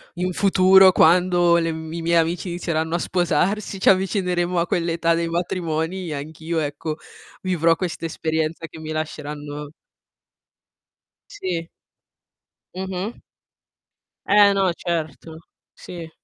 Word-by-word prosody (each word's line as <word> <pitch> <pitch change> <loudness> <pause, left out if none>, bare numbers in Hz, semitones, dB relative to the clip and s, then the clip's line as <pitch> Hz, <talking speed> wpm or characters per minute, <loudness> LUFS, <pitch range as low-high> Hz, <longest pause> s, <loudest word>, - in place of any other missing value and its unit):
in 180 +1 -1
futuro 190 0 +6
quando 175 0 +4
le 165 -1 0
m 160 0 -7
i 170 - -4
miei 170 +1 +1
amici 165 +3 0
inizieranno 165 -1 -2
a - - 0
sposarsi, 185 +4 0
ci - - +5
avvicineremo 180 -2 +1
a 170 - 0
quell'età 170 -1 +1
dei 170 0 -1
matrimoni, 170 +1 -2
e 155 - -3
anch'io 160 +3 -4
ecco 150 +1 -3 0.5
vivrò 165 -3 +2
questa 170 -2 -4
esperienza 160 0 -2
che 160 - -12
mi 155 0 -6
lasceranno 150 -1 -5 1.6
Sì. 170 -3 -4 1.1
Mh-mh. 190 +3 -4 1.1
Eh 205 0 +6
no, 195 -1 +2
e - - -1
certo, 160 -1 -4 0.4
sì. 170 -2 -9
170 Hz, 120 wpm, -22 LUFS, 160-180 Hz, 1.6 s, futuro